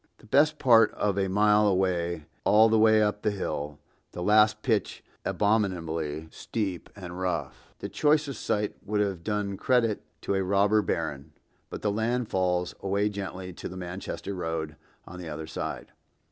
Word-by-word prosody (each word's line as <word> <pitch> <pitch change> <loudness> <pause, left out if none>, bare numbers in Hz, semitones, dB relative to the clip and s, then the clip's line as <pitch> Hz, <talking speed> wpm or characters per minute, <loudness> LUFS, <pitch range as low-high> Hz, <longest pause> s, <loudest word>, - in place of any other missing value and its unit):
The - - -19
best 150 +6 +3
part 115 -5 +5
of 100 -2 0
a 100 -1 +1
mile 105 +2 +4
away 90 -3 +1
and 80 -3 -13 0.2
all 110 +2 +6
the 110 0 +3
way 110 0 +5
up 105 0 -1
hill, 75 -8 -2 0.4
the 90 - -4
last 105 +1 +4
pitch 110 -5 0 0.2
abominably 85 -7 -1
steep 95 -6 -4
and 90 -3 -8
rough, 85 -7 -4
the - - -5
choice 150 0 +2
of 140 - -5
site 105 -2 -1
would 105 0 -1
have 100 -4 -1
done 105 -1 -2
credit 115 -3 +2 0.2
to - - -1
a 95 0 +1
robber 100 +3 +3
baron, 75 -8 -3 0.4
but - - -7
the 105 - +2
land 115 +3 -1
falls 90 -1 0
away 100 +2 0
gently 95 -2 -6
to - - -7
the 95 - -8
Manchester 95 +2 -5
road 80 -4 -3 0.3
on 90 +1 -10
the 85 -3 -7
other 80 +1 -5
side. - - -5
100 Hz, 170 wpm, -27 LUFS, 90-105 Hz, 0.4 s, all